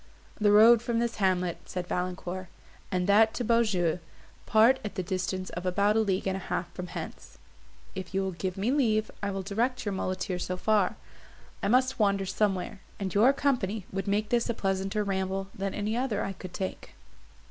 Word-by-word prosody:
"The 210 Hz, -1 st, +4 dB
road 220 Hz, +2 st, +8 dB
from 235 Hz, -1 st, -1 dB
this 235 Hz, 0 st, -1 dB
hamlet," 180 Hz, -3 st, +1 dB
said 180 Hz, -1 st, -3 dB
Valancourt, 180 Hz, +1 st, -3 dB, 0.4 s
"and 180 Hz, -1 st, 0 dB
that 220 Hz, +3 st, +5 dB
to 245 Hz, -, -2 dB
Beaujeu, 205 Hz, -8 st, +2 dB, 0.5 s
part 230 Hz, +4 st, +5 dB
at 210 Hz, -, -5 dB
the 185 Hz, -, -2 dB
distance 185 Hz, 0 st, -3 dB
of 175 Hz, -, -5 dB
about 200 Hz, +3 st, +2 dB
a -, -, +4 dB
league 195 Hz, -3 st, 0 dB
and 190 Hz, -1 st, 0 dB
a -, -, -3 dB
half 175 Hz, -1 st, -4 dB
from 180 Hz, -1 st, -6 dB
hence; 175 Hz, -2 st, -8 dB, 0.6 s
if 190 Hz, -2 st, -6 dB
you 195 Hz, 0 st, 0 dB
will 190 Hz, -, -1 dB
give 185 Hz, +2 st, -4 dB
me 210 Hz, +6 st, +1 dB
leave, 220 Hz, -6 st, +2 dB
I 200 Hz, -, -1 dB
will 195 Hz, -1 st, -3 dB
direct 235 Hz, +6 st, -1 dB
your 205 Hz, -, -1 dB
muleteer 185 Hz, 0 st, -2 dB
so 180 Hz, 0 st, -3 dB
far. 210 Hz, -1 st, +2 dB, 0.7 s
I -, -, 0 dB
must 255 Hz, +3 st, +2 dB
wander 200 Hz, -2 st, +2 dB
somewhere, 190 Hz, 0 st, -1 dB, 0.2 s
and 190 Hz, -3 st, -3 dB
your 225 Hz, +6 st, +6 dB
company 225 Hz, -8 st, 0 dB
would 195 Hz, 0 st, -3 dB
make 205 Hz, +1 st, 0 dB
this 240 Hz, 0 st, +1 dB
a 235 Hz, -, 0 dB
pleasanter 195 Hz, +1 st, -1 dB
ramble 195 Hz, 0 st, -2 dB
than 195 Hz, 0 st, -3 dB
any 210 Hz, +2 st, -1 dB
other 240 Hz, -4 st, -1 dB
I 195 Hz, -, -3 dB
could 185 Hz, -2 st, -9 dB
take." 190 Hz, -, -5 dB
195 Hz, 190 wpm, -28 LUFS, 185-220 Hz, 0.7 s, road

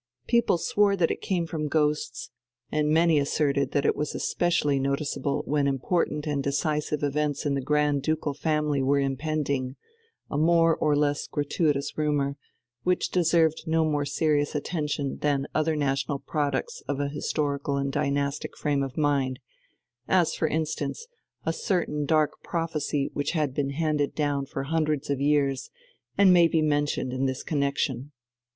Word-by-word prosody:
People 235 Hz, -6 st, +3 dB
swore 200 Hz, +4 st, +2 dB
that 175 Hz, -4 st, +2 dB
it -, -, -4 dB
came 175 Hz, -3 st, -1 dB
from 160 Hz, -2 st, -3 dB
ghosts, 150 Hz, 0 st, -1 dB, 0.4 s
and 150 Hz, 0 st, +1 dB
many 160 Hz, 0 st, +4 dB
asserted 140 Hz, 0 st, +1 dB
that 145 Hz, -, +1 dB
it -, -, +3 dB
was 150 Hz, -, -3 dB
especially 150 Hz, -5 st, +1 dB
noticeable 140 Hz, +1 st, -1 dB
when 145 Hz, -1 st, +1 dB
important 150 Hz, +2 st, 0 dB
and 145 Hz, -2 st, -1 dB
decisive 150 Hz, +1 st, -1 dB
events 145 Hz, +1 st, -1 dB
in 145 Hz, -, +1 dB
the 140 Hz, -, -1 dB
Grand 150 Hz, 0 st, +1 dB
Ducal 155 Hz, 0 st, -1 dB
family 150 Hz, -1 st, 0 dB
were 140 Hz, +2 st, +2 dB
impending, 140 Hz, -1 st, -1 dB, 0.5 s
a 145 Hz, -, -2 dB
more 165 Hz, 0 st, +4 dB
or 150 Hz, -1 st, +1 dB
less 145 Hz, 0 st, 0 dB
gratuitous 145 Hz, -1 st, -1 dB
rumour, 145 Hz, -2 st, 0 dB, 0.5 s
which 180 Hz, 0 st, +1 dB
deserved 165 Hz, -2 st, +2 dB
no 160 Hz, 0 st, +2 dB
more 150 Hz, -2 st, 0 dB
serious 145 Hz, +1 st, 0 dB
attention 150 Hz, -2 st, -2 dB
than 140 Hz, -2 st, +1 dB
other 155 Hz, 0 st, +1 dB
national 140 Hz, -1 st, 0 dB
products 155 Hz, -, -2 dB
of 140 Hz, -, -2 dB
an 145 Hz, 0 st, 0 dB
historical 140 Hz, -1 st, -1 dB
and 140 Hz, 0 st, -1 dB
dynastic 140 Hz, 0 st, -1 dB
frame 145 Hz, -2 st, 0 dB
of 135 Hz, -2 st, -4 dB
mind, 140 Hz, -4 st, +1 dB, 0.7 s
as 180 Hz, -3 st, +3 dB
for 160 Hz, -, 0 dB
instance 155 Hz, -, -2 dB, 0.4 s
a -, -, +1 dB
certain 170 Hz, -, -1 dB
dark 155 Hz, -1 st, +1 dB
prophecy 155 Hz, -4 st, -2 dB
which 145 Hz, -, -2 dB
had 150 Hz, -5 st, 0 dB
been 140 Hz, 0 st, -1 dB
handed 150 Hz, 0 st, -1 dB
down 145 Hz, -2 st, 0 dB
for 135 Hz, -1 st, -4 dB
hundreds 155 Hz, -1 st, -1 dB
of 140 Hz, -1 st, -1 dB
years 140 Hz, -2 st, +1 dB, 0.5 s
and 195 Hz, -2 st, +7 dB
may 170 Hz, -1 st, +6 dB
be 160 Hz, -1 st, +1 dB
mentioned 145 Hz, -3 st, 0 dB
in 130 Hz, +1 st, 0 dB
this 130 Hz, 0 st, -3 dB
connexion. 140 Hz, -2 st, -1 dB
150 Hz, 155 wpm, -26 LUFS, 140-155 Hz, 0.7 s, and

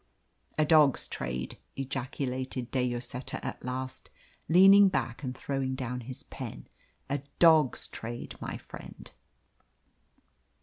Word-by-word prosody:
"A 155 Hz, -, +4 dB
dog's 150 Hz, -3 st, +5 dB
trade!" 65 Hz, 0 st, -4 dB, 0.2 s
ejaculated 130 Hz, -1 st, -3 dB
De 130 Hz, -, +1 dB
Lloseta 120 Hz, +1 st, -4 dB
at -, -, -5 dB
last, 130 Hz, +1 st, -4 dB, 0.4 s
leaning 195 Hz, +3 st, +8 dB
back 120 Hz, -9 st, -2 dB
and 130 Hz, -2 st, -4 dB
throwing 135 Hz, -1 st, -2 dB
down 125 Hz, -1 st, -3 dB
his 125 Hz, +1 st, -8 dB
pen, -, -, -8 dB, 0.4 s
"a 145 Hz, +1 st, -1 dB, 0.2 s
dog's 160 Hz, -6 st, +5 dB
trade, 120 Hz, +1 st, -6 dB
my -, -, -4 dB
friend!" -, -, -11 dB
130 Hz, 115 wpm, -30 LUFS, 125-145 Hz, 0.4 s, leaning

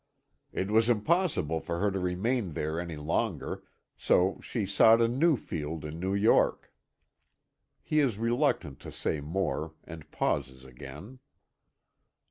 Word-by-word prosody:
It 95 Hz, +2 st, -2 dB
was 110 Hz, +2 st, +4 dB
impossible 120 Hz, -, +1 dB
for 85 Hz, +1 st, -4 dB
her 100 Hz, +2 st, +1 dB
to 95 Hz, -, -2 dB
remain 95 Hz, +2 st, -1 dB
there 80 Hz, +2 st, -2 dB
any 85 Hz, -2 st, -5 dB
longer, 75 Hz, +2 st, -2 dB, 0.4 s
so 95 Hz, +2 st, +2 dB
she 115 Hz, -5 st, -3 dB
sought 110 Hz, +4 st, +6 dB
a 115 Hz, -, +4 dB
new 140 Hz, +5 st, +3 dB
field 80 Hz, -5 st, -5 dB
in 75 Hz, +2 st, -6 dB
New 95 Hz, +2 st, -1 dB
York." 105 Hz, +3 st, +2 dB, 1.1 s
He 155 Hz, -, +1 dB
is 130 Hz, -8 st, +2 dB
reluctant 115 Hz, -, 0 dB
to -, -, -9 dB
say 75 Hz, -, -2 dB
more, 80 Hz, -1 st, -2 dB
and 80 Hz, -2 st, -11 dB
pauses 65 Hz, -1 st, -2 dB
again. 70 Hz, -, -11 dB
95 Hz, 135 wpm, -29 LUFS, 80-115 Hz, 1.1 s, sought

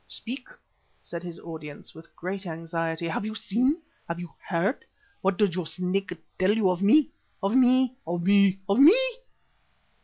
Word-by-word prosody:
"Speak," 250 Hz, +2 st, -5 dB, 0.5 s
said 170 Hz, -1 st, -7 dB
his 175 Hz, -1 st, -8 dB
audience, 155 Hz, -3 st, -9 dB
with 160 Hz, +1 st, -15 dB
great 190 Hz, +2 st, -5 dB
anxiety. 165 Hz, 0 st, -3 dB
"Have 165 Hz, -, -2 dB
you 215 Hz, +1 st, -5 dB
seen? 255 Hz, -, 0 dB, 0.3 s
Have 170 Hz, 0 st, -4 dB
you 175 Hz, -1 st, -8 dB, 0.2 s
heard? 190 Hz, +7 st, 0 dB, 0.4 s
What 190 Hz, -1 st, +1 dB
does 205 Hz, -5 st, +2 dB
your 175 Hz, -2 st, -3 dB
Snake 185 Hz, +2 st, -2 dB, 0.3 s
tell 195 Hz, +4 st, +3 dB
you 195 Hz, -4 st, +3 dB
of 180 Hz, 0 st, -3 dB
me? 265 Hz, +9 st, +4 dB, 0.3 s
Of 195 Hz, +2 st, +1 dB
me? 255 Hz, 0 st, +4 dB
Of 170 Hz, 0 st, -2 dB
me? 200 Hz, 0 st, +4 dB
Of 200 Hz, +4 st, +2 dB
me?" 335 Hz, -, +9 dB
190 Hz, 160 wpm, -26 LUFS, 170-220 Hz, 0.5 s, me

